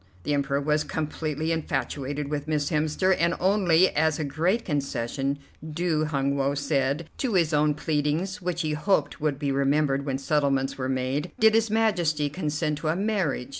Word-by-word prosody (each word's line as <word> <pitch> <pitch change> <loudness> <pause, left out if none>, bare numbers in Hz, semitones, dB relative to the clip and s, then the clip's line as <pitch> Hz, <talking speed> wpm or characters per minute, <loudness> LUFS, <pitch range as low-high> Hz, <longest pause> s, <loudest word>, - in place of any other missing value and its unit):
The 145 - -1
Emperor 140 0 0
was 150 +1 +1
completely 155 +1 -3
infatuated 145 -3 -2
with 145 0 -3
Miss 150 -1 0
Hemster, 155 +5 +2
and 170 0 +2
only 185 -2 +4
as 160 0 +1
a 155 - -2
great 165 +10 0
concession, 140 -2 -2 0.3
due, 160 0 -1
Hun 140 -2 0
Woe 140 0 0
said, 140 +2 0
to 245 -7 0
his 165 -3 +2
own 150 0 +3
pleadings, 160 +6 -1
which 175 -1 -2
he 155 - -1
hoped 150 -2 0
would 150 -2 0
be 140 -1 -1
remembered 140 0 +1
when 135 -2 -2
settlements 135 -1 0
were 130 -1 -3
made, 130 +3 -2
did 220 0 +6
his 225 0 +3
Majesty 175 -10 +1
consent 150 -2 -2
to 155 - -4
a 155 - +1
marriage. 190 - -1
150 Hz, 170 wpm, -26 LUFS, 140-170 Hz, 0.3 s, did